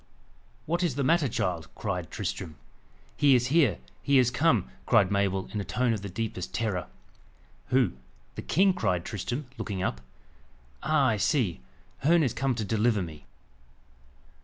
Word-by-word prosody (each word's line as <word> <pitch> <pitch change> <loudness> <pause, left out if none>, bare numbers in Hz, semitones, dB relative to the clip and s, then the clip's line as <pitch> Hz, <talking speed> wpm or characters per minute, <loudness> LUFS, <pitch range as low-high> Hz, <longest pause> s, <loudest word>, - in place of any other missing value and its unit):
"What 170 +3 0
is 170 -8 0
the 140 - 0
matter, 155 0 +3
child?" 90 -6 -2
cried 90 -6 -3
Tristram.. 80 - -4 0.6
"He 140 -2 +5
is 125 +1 +1
here! 145 - +4 0.2
he 140 -1 +3
is 125 -2 +4
come!" 125 - +2 0.2
cried 95 0 +4
Mabel, 100 -1 0
in 105 - -1
a - - -3
tone 125 +3 0
of 105 - -3
the 100 - -6
deepest 95 -2 -4
terror. 100 -7 -1 0.8
"Who 130 -1 +2 0.4
the - - -6
king?" 190 +4 +3
cried 90 - -1
Tristram, 120 - -4
looking 100 -4 -3
up. - - -2 0.8
"Ah! 155 -3 +2
I 110 - +1
see! 100 - +1 0.4
Herne 165 +4 +4
is 130 - 0
come 135 -1 0
to 110 -2 -2
deliver 110 -1 +1
me." 80 -3 -10
115 Hz, 160 wpm, -28 LUFS, 95-135 Hz, 0.8 s, He